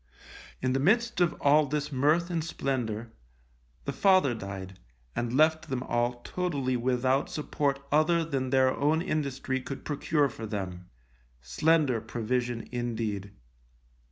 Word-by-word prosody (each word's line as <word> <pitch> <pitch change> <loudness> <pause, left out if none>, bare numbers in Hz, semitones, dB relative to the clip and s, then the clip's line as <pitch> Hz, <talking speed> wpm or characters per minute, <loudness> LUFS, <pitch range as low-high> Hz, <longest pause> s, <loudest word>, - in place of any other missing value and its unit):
In 130 0 +2
the 135 - +1
midst 225 - +2
of 175 -2 +3
all 145 +1 +4
this 150 +1 -2
mirth 150 +6 +2
and 165 -2 -1
splendour, 120 -8 -3 0.7
the - - -2
father 185 -10 +4
died, 95 -3 -7 0.4
and 120 +2 -1
left 155 +1 +3
them 130 -1 -2
all 120 0 -1
totally 145 -8 -1
without 130 +2 +1
support 145 -2 -1
other 160 +3 +3
than 135 -4 -2
their 130 0 +3
own 155 +4 +2
industry 140 -5 -2
could 135 +1 -7
procure 145 0 +1
for 115 -4 -7
them, 90 -4 -5 0.5
slender 130 - +2
provision 120 +1 -2
indeed! 110 -5 -3
130 Hz, 130 wpm, -29 LUFS, 120-155 Hz, 0.7 s, all